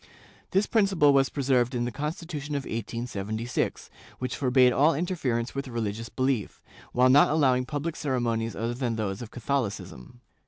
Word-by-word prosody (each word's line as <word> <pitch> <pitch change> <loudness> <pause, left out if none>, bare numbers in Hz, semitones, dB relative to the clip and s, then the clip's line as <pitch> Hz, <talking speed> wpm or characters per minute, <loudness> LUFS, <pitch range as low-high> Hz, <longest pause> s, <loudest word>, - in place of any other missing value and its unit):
This 195 +3 +2
principle 195 -10 +3
was 135 -1 +4
preserved 130 -3 +1
in 120 0 0
the 120 - -3
Constitution 150 +1 -4
of 140 - -2
1876, 115 0 -3 0.3
which 125 - -3
forbade 125 -2 +4
all 150 +5 +4
interference 140 -9 -1
with 140 0 -4
religious 115 -2 -3
belief, 130 -6 -1 0.3
while 125 +1 +4
not 140 +3 +6
allowing 130 -5 +2
public 155 +2 -3
ceremonies 120 -5 -1
other 115 +2 -2
than 120 -2 -2
those 100 -2 -3
of 120 - -7
Catholicism. 110 - -4
125 Hz, 150 wpm, -27 LUFS, 115-145 Hz, 0.3 s, not